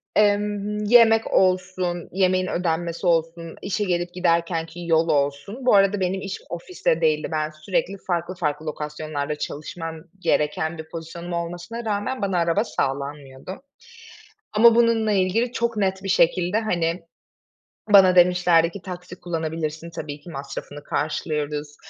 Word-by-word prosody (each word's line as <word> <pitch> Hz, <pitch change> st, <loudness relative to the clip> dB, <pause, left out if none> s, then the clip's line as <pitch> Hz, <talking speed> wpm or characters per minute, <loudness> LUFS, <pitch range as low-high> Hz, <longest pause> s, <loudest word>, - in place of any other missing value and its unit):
Emm, 210 Hz, 0 st, +1 dB
yemek 225 Hz, 0 st, +5 dB
olsun, 185 Hz, -2 st, +1 dB
yemeğin 185 Hz, 0 st, +2 dB
ödenmesi 170 Hz, 0 st, -2 dB
olsun, 165 Hz, 0 st, 0 dB
işe 205 Hz, +2 st, -1 dB
gelip 175 Hz, -2 st, -1 dB
giderkenki 170 Hz, -1 st, -1 dB
yol 165 Hz, 0 st, +3 dB
olsun... 145 Hz, -, -1 dB
Bu 250 Hz, -, +5 dB
arada 195 Hz, 0 st, +4 dB
benim 185 Hz, +1 st, -1 dB
iş 195 Hz, -, -5 dB
ofiste 170 Hz, -1 st, -1 dB
değildi. 155 Hz, -1 st, +2 dB
Ben 155 Hz, -1 st, -1 dB
sürekli 175 Hz, +5 st, -2 dB
farklı 175 Hz, +1 st, -1 dB
farklı 155 Hz, -2 st, -2 dB
lokasyonlarda 150 Hz, -1 st, -4 dB
çalışmam 160 Hz, +3 st, -6 dB, 0.2 s
gereken 160 Hz, 0 st, 0 dB
bir 160 Hz, 0 st, -9 dB
pozisyonum 170 Hz, +1 st, -7 dB
olmasına 175 Hz, +7 st, -5 dB
rağmen 210 Hz, +4 st, -2 dB
bana 195 Hz, -3 st, 0 dB
araba 170 Hz, +5 st, +2 dB
sağlanmıyordu 140 Hz, -, -4 dB, 0.9 s
ama 225 Hz, +2 st, +6 dB
bununla 230 Hz, -2 st, +3 dB
ilgili 205 Hz, +5 st, +1 dB
çok 235 Hz, -2 st, -1 dB
net 190 Hz, -1 st, 0 dB
bir 195 Hz, -, -4 dB
şekilde, 180 Hz, +2 st, +3 dB
hani, 170 Hz, -5 st, -1 dB, 0.9 s
bana 185 Hz, -2 st, +8 dB
demişlerdi 175 Hz, -2 st, +5 dB
ki, 200 Hz, -, -9 dB
"Taksi 180 Hz, 0 st, -8 dB
kullanabilirsin, 160 Hz, -1 st, -3 dB
tabii 150 Hz, -3 st, -7 dB
ki 170 Hz, -, -13 dB
masrafını 140 Hz, +1 st, -7 dB
karşılıyoruz 150 Hz, -1 st, -3 dB
175 Hz, 130 wpm, -23 LUFS, 160-195 Hz, 0.9 s, bana